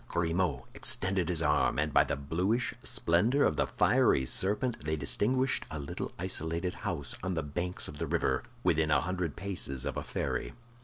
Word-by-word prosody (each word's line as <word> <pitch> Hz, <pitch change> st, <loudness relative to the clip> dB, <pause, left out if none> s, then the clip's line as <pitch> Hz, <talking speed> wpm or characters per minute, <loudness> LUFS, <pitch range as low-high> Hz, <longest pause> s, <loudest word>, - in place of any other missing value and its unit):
Grimaud 85 Hz, -1 st, 0 dB
extended 95 Hz, -1 st, 0 dB
his 85 Hz, -2 st, +2 dB
arm, 75 Hz, -, +2 dB
and 75 Hz, 0 st, 0 dB
by -, -, +6 dB
the -, -, -2 dB
bluish 90 Hz, -, 0 dB
splendor 110 Hz, +12 st, +2 dB
of 75 Hz, -, +2 dB
the 75 Hz, -, +1 dB
fiery 65 Hz, -, +3 dB
serpent 105 Hz, -, +1 dB
they 80 Hz, +1 st, -1 dB
distinguished 125 Hz, -, 0 dB
a 80 Hz, -, -5 dB
little 70 Hz, -1 st, -5 dB
isolated 90 Hz, 0 st, -2 dB
house 80 Hz, -10 st, -3 dB
on 95 Hz, -1 st, -2 dB
the 80 Hz, -, -1 dB
banks 85 Hz, +5 st, -3 dB
of 75 Hz, -, -9 dB
the -, -, -2 dB
river, 65 Hz, 0 st, +1 dB, 0.2 s
within 80 Hz, -3 st, +2 dB
a 75 Hz, -3 st, +4 dB
hundred 90 Hz, -3 st, -2 dB
paces 85 Hz, -9 st, -1 dB
of -, -, -3 dB
a -, -, -2 dB
ferry. -, -, -3 dB
85 Hz, 175 wpm, -31 LUFS, 75-95 Hz, 0.2 s, by